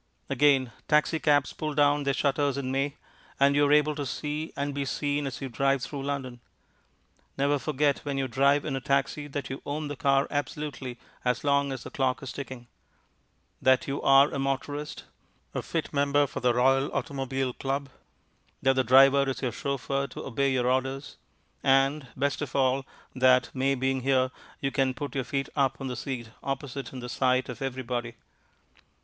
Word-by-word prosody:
Again, 135 -4 +3 0.2
taxicabs 150 -1 +3
pull 155 -1 -4
down 145 0 +3
their 140 -1 +1
shutters 140 0 +1
in 130 -2 -2
May, 135 +2 -1 0.4
and 140 +1 +5
you 145 0 +4
are - - +1
able 150 0 +4
to 145 -1 -4
see 150 +5 -4
and 140 0 -2
be 140 0 -2
seen 145 +1 -1
as 130 - -5
you 135 - -3
drive 135 +1 +1
through 140 +2 -5
London. 135 -3 -4 1.0
Never 140 +1 +2
forget 145 0 +1
when 140 -1 -4
you 135 -1 0
drive 140 +3 +3
in - - -2
a 135 - -3
taxi 140 +2 0
that 140 -1 -5
you 135 - -5
own 150 +1 -3
the 145 - -4
car 135 +1 +2
absolutely 145 -3 -4 0.3
as 125 0 0
long 140 -1 +2
as 130 -3 -5
the - - -9
clock 130 -2 0
is 130 - -5
ticking; 130 -3 -7 1.0
that 130 -1 +4
you 140 +1 -2
are 135 +1 +6
a - - -2
motorist, 140 +2 -3 0.5
a - - -2
fit - - -3
member 145 0 +3
for - - -5
the 120 -1 +2
Royal 135 +2 +3
Automobile 135 -1 -2
Club; 140 +2 -2 0.7
that 135 0 +3
the 130 0 +2
driver 135 +2 +6
is 135 - -4
your 125 - 0
chauffeur 140 +2 -2
to - - -8
obey 135 +2 0
your 125 -2 +1
orders; 130 +2 -1 0.4
and, 135 +1 +3
best 140 +2 0
of 145 -3 -5
all, 135 0 +2 0.3
that, 130 -1 +4
May 135 +1 +1
being 130 0 0
here, 130 -1 +2 0.3
you 135 - 0
can 130 -2 +1
put 140 0 -5
your 135 -2 -2
feet 135 +2 -2
upon 135 -1 0
the 125 - -3
seat 120 -2 -5
opposite 135 0 -4
in 130 - -7
the 125 - -6
sight 130 0 +1
of 125 -1 -7
everybody. 125 -3 -3
135 Hz, 180 wpm, -28 LUFS, 130-140 Hz, 1.0 s, are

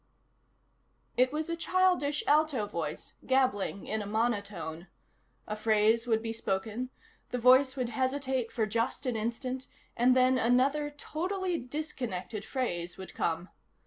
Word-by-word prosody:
It 255 +1 +4
was 305 +1 -2
a 335 - -1
childish, 345 -4 +2
alto 295 -6 +3
voice, 165 -6 -4
gabbling 255 -7 +1
in 220 0 -2
a 205 - -5
monotone. 205 -6 -2 0.6
A 210 - -3
phrase 220 +2 +3
would 225 -1 +2
be 225 0 -2
spoken, 220 +3 -2 0.4
the 250 - -2
voice 260 +2 +6
would 250 -3 -1
hesitate 260 0 -1
for 225 - 0
just 230 +5 -1
an 250 -2 0
instant, 250 +4 -3 0.3
and 250 +2 +4
then 255 0 +4
another, 270 +5 +3
totally 355 +4 -2
disconnected 245 - -4
phrase 180 -10 -3
would 190 - -9
come. 170 +2 -1
245 Hz, 135 wpm, -30 LUFS, 215-275 Hz, 0.6 s, voice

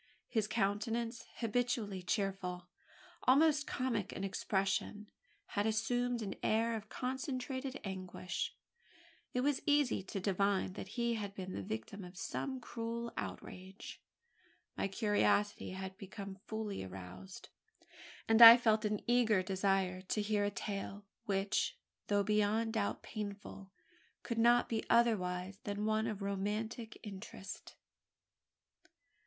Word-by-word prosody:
His 220 -4 0
countenance, 225 +3 -1
habitually 230 -4 -1
cheerful 180 -2 -2 0.6
almost 290 +2 +5
comic 245 -7 -1
in 195 - -5
its 195 - -1
expression 195 +2 -1 0.4
had 205 0 0
assumed 240 +2 0
an 195 - -3
air 225 +1 +2
of 215 -1 -6
concentrated 260 0 -3
anguish. 185 -1 -4 0.8
It 250 - +2
was 285 +1 +1
easy 290 -7 +3
to 195 +1 -5
divine 195 0 +1
that 190 - -6
he 235 0 +2
had 205 -3 -4
been 185 -1 -5
the - - -3
victim 110 - -5
of 180 0 -11
some 265 +6 -3
cruel 235 0 -4
outrage. 190 +2 -7 0.7
My - - 0
curiosity 205 0 +2
had 190 0 -5
become 195 -1 -7
fully 220 - -3
aroused; 95 0 -9 0.8
and 225 +1 +5
I 230 +1 +14
felt 220 -3 +3
an 210 -1 0
eager 230 -5 +4
desire 190 -1 +1
to 195 +3 -1
hear 205 0 +1
a 205 - +2
tale, 200 0 -5 0.2
which, 195 0 0 0.3
though 205 -1 +3
beyond 215 +2 +2
doubt 210 -3 -1
painful, 200 -2 -6 0.5
could 235 -2 -2
not 240 +1 +5
be 225 -1 -1
otherwise 190 -5 +2
than 205 0 -2
one 220 +1 +1
of 210 -3 -3
romantic 210 +3 -3
interest. 195 -1 -8
210 Hz, 125 wpm, -35 LUFS, 195-230 Hz, 0.8 s, I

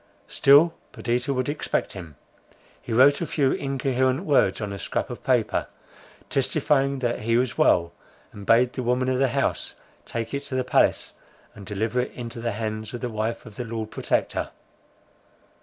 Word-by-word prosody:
Still 145 +5 +5 0.2
Perdita 125 +3 -1
would 130 -2 -1
expect 145 +1 -2
him; 85 -6 -9 0.7
he - - -8
wrote 135 +7 +5
a 170 - -1
few 140 -4 +1
incoherent 135 +2 0
words 145 -3 +3
on 105 -2 -4
a 100 - -6
scrap - - -3
of - - -8
paper, - - +1 0.6
testifying 140 0 +1
that 120 -2 -1
he 115 +2 +1
was 125 0 0
well, 85 - +3 0.4
and 100 - -9
bade 120 +2 +4
the 130 - -3
woman 125 +1 +1
of 130 0 0
the 135 - +4
house 120 - -1 0.3
take 115 +2 -4
it 140 - -1
to 130 - -5
the 130 - +1
palace, 125 - +2 0.4
and 100 -3 -12
deliver 110 +4 -1
it 125 - -1
into 120 -1 -7
the 115 -1 -2
hands 110 +1 -4
of 120 - -7
the 125 - -2
wife 110 +1 -3
of 110 -3 -12
the 125 - -3
Lord 110 -2 -5
Protector. - - -1
125 Hz, 175 wpm, -25 LUFS, 110-135 Hz, 0.7 s, Still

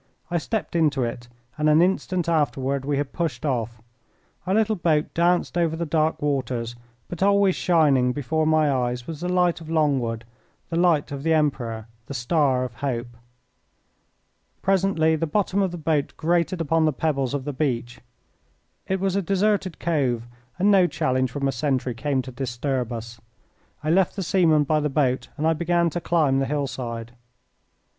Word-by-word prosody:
I 175 - +1
stepped 215 +2 -3
into 150 -5 +2
it, 120 0 -5 0.3
and 155 0 +3
an 155 +1 +5
instant 180 -1 +1
afterward 140 -4 0
we 145 0 0
had 140 -1 -3
pushed 155 -7 -3
off. 115 -5 -2 0.6
Our 190 - +2
little 220 0 +2
boat 160 -4 0
danced 175 +1 +1
over 165 -2 +1
the 170 +1 -3
dark 155 -1 0
waters, 125 -5 -1 0.3
but 175 - -7
always 200 -1 +4
shining 145 -8 +3
before 155 +4 -1
my 155 -2 +3
eyes 125 -2 -1
was 160 0 -7
the 180 - -2
light 180 -2 +2
of 160 - -10
Longwood, 135 -8 0 0.5
the - - -1
light 170 -5 +2
of 140 -1 -5
the 160 +2 +2
Emperor, 120 -8 -1 0.2
the 140 - -6
star 130 0 +1
of 125 -2 -5
hope. 120 -3 -3 1.5
Presently 190 -5 +2
the 165 +1 -1
bottom 200 +3 0
of 190 - +1
the 175 - -6
boat 155 -3 -1
grated 170 +2 0
upon 165 0 +2
the 155 - +2
pebbles 140 -2 -1
of 135 -2 -4
the 145 - -3
beach. 125 -4 -2 0.9
It 190 0 0
was 195 0 0
a 200 - +2
deserted 195 -1 0
cove, 130 -8 0 0.3
and 200 +3 +3
no 190 -3 +5
challenge 130 -6 0
from 140 +2 -2
a - - +1
sentry 130 -1 -1
came 135 +2 -1
to 130 - -8
disturb 125 0 -3
us. 115 0 -7 0.6
I 155 - +1
left 185 +1 +2
the 195 - -3
seaman 165 -4 +3
by 155 +1 +1
the 150 0 -1
boat 135 -2 0
and 155 - -1
I 160 - +4
began 170 +1 +1
to 175 - -3
climb 150 -7 +2
the 135 - 0
hillside. 120 -5 -4
150 Hz, 175 wpm, -24 LUFS, 130-170 Hz, 1.5 s, an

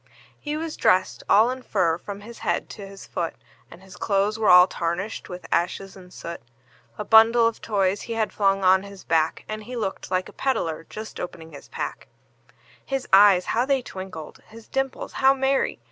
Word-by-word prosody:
He 295 0 -4
was 320 0 -5
dressed 185 0 +2
all 220 +4 +5
in 260 0 -6
fur 170 -8 0
from 200 +1 -8
his 230 +3 -11
head - - -2
to 200 -2 -9
his 195 0 -11
foot, 170 -2 -4 0.3
And 180 - -14
his 190 -1 -14
clothes 205 +2 0
were 215 - +2
all 180 0 +9
tarnished 180 +4 -4
with 180 0 -8
ashes 180 +3 -1
and 180 -2 -14
soot; 170 -1 -8 0.6
A - - -5
bundle 225 +1 +6
of 230 -1 -1
toys 195 -2 0
he 230 - -5
had 225 -1 -1
flung 195 -1 +1
on 190 +1 +5
his 200 -1 -11
back, 160 -1 0
And 215 0 -6
he 250 - -7
looked 205 -4 -4
like 185 0 -1
a - - -13
peddler 165 -12 -2
just 215 +1 -8
opening 165 -2 -7
his 145 - -12
pack; - - -6 0.8
His 270 -2 -3
eyes 195 -2 +7
how 235 - +2
they 270 -2 +1
twinkled! 185 -7 -8
his 225 0 -14
dimples 270 0 -3
how 270 +1 +6
merry! 270 0 0
200 Hz, 190 wpm, -24 LUFS, 185-230 Hz, 0.8 s, all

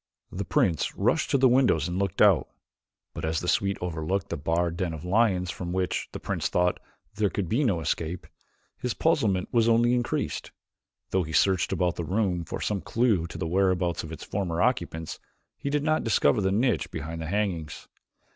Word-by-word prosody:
The - - -4
prince 85 -4 +1
rushed - - +1
to - - +3
the 130 0 +5
windows 120 - +3
and 90 +1 -2
looked 100 -3 +2
out, - - +5 0.7
but - - -7
as 80 0 0
the 90 - -5
suite 100 +2 +1
overlooked 90 +2 -2
the - - -2
barred 85 +3 0
den 85 -2 -2
of 80 +2 -9
lions 95 -2 +2
from 90 -2 -5
which, 95 -1 -1
the - - -6
prince - - -2
thought, 90 0 +1 0.4
there 105 -2 +2
could 95 -2 -3
be 120 - +1
no 95 -10 +1
escape, 80 +2 -2 0.5
his 125 -3 -2
puzzlement 110 - +1
was 115 -1 +3
only 120 +1 +4
increased. 120 -1 -1 0.6
Though 95 - +2
he 80 -2 -5
searched 95 +1 +3
about 90 -2 0
the 85 - -2
room 90 -1 0
for - - -5
some 100 -3 -1
clue 110 -8 +1
to 85 - -8
the 85 - -3
whereabouts 90 -1 +1
of 80 - -8
its 80 - -7
former 90 -4 -2
occupants 85 -8 -1 0.4
he 140 - -4
did 145 0 0
not 155 0 +1
discover 105 -5 +3
the 95 0 +1
niche 120 +5 +1
behind 80 +1 -5
the 80 - -4
hangings. 90 -6 -2
90 Hz, 195 wpm, -27 LUFS, 85-110 Hz, 0.7 s, the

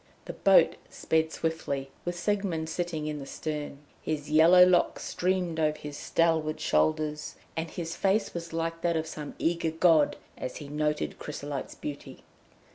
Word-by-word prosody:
The - - -6
boat - - +5
sped 160 0 0
swiftly, 140 -5 -3
with 175 0 -3
Siegmund 180 -5 -1
sitting 160 -2 -3
in 150 -1 -3
the 135 - -8
stern. 150 -2 -4 0.2
His 150 -1 -3
yellow 170 +4 +8
locks 180 -1 +2
streamed 180 -2 -1
over 155 -1 +1
his 150 -1 -7
stalwart 160 -1 +1
shoulders, 155 -1 0 0.2
and 160 0 -3
his 165 0 -5
face 200 +2 +1
was 170 -1 -6
like 165 0 -2
that 170 -1 +1
of 160 - -1
some 150 -2 -7
eager 170 0 0
god 160 -2 +4 0.2
as 130 - -4
he 145 -2 -8
noted 150 0 -1
Chrysolite's 145 -2 -5
beauty. 145 -1 -8
160 Hz, 155 wpm, -28 LUFS, 150-170 Hz, 0.2 s, yellow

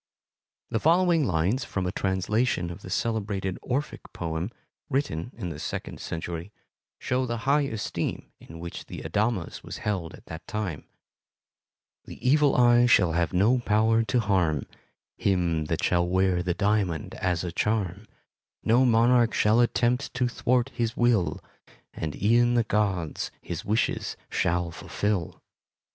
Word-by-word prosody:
The 115 - +1
following 170 - +3
lines 95 - +1
from 95 -6 -3
a 90 - -1
translation 95 0 0
of 85 - -9
the - - -9
celebrated 100 -3 -2
Orphic 135 +4 -2
poem, 80 +3 -3 0.4
written 130 - -1
in 95 -7 -4
the 75 -3 -7
second - - -5
century, 85 +3 -5 0.5
show 130 0 -1
the 115 0 -4
high 140 +1 +3
esteem 110 -2 -4
in 80 +1 -12
which 85 0 -7
the - - -7
adamas 105 +2 -1
was - - -7
held 95 -6 -2
at - - -18
that 80 0 -9
time: 105 -9 -4 1.2
The - - -10
Evil 145 +1 +4
Eye 120 0 +5
shall 90 -7 +5
have 85 0 0
no 105 +8 +3
power 110 0 +3
to 115 +4 +1
harm 90 - +1 0.5
Him 85 -5 +1
that - - -2
shall 85 0 +2
wear 95 0 +2
the 90 -1 -1
diamond 100 -6 0
as 90 -2 0
a 90 - -3
charm, 105 +1 -1 0.6
No 120 +4 +4
monarch 120 0 +4
shall 110 +2 +4
attempt 120 +2 +1
to 125 -1 +2
thwart 125 +1 +1
his 115 -3 -2
will, 120 -7 +2 0.5
And 80 -2 -4
e'en 120 +4 +3
the 120 - +4
gods 100 -7 -1
his - - -6
wishes 110 +3 -1
shall 85 0 0
fulfil. 100 +1 -3
105 Hz, 145 wpm, -27 LUFS, 90-120 Hz, 1.2 s, Eye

